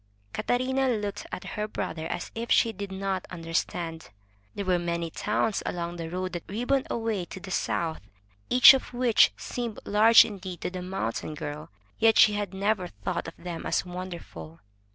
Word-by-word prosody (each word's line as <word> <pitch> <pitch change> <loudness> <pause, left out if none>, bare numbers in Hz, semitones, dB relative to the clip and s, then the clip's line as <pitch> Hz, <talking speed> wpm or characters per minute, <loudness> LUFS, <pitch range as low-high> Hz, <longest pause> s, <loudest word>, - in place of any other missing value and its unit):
Catarina 260 +2 +1
looked 210 -4 -2
at - - -5
her 210 0 -4
brother 160 -6 -4
as - - -4
if 230 +1 -5
she 230 - +4
did 200 0 -6
not 190 -1 -3
understand. 165 -1 -3 0.5
There 200 - -3
were 180 -1 +2
many 170 -1 -2
towns 210 +3 0
along 170 0 -4
the 165 -1 -5
road 185 +2 -3
that 175 - -6
ribboned 245 +6 0
away 225 -5 -1
to 190 - -9
the 190 0 -9
south, 165 -2 -1 0.5
each 250 +1 +10
of 260 -2 -3
which 240 -2 +5
seemed 235 -3 -4
large 220 +3 +7
indeed 185 -4 -7
to - - -3
the 185 0 -5
mountain 180 -5 -3
girl, 150 0 -6 0.3
yet 225 -1 +5
she 210 - +7
had 205 -2 -2
never 195 -1 0
thought 100 - -4
of 165 - -9
them 175 -1 -6
as - - 0
wonderful. 175 - -8
190 Hz, 175 wpm, -27 LUFS, 170-220 Hz, 0.5 s, each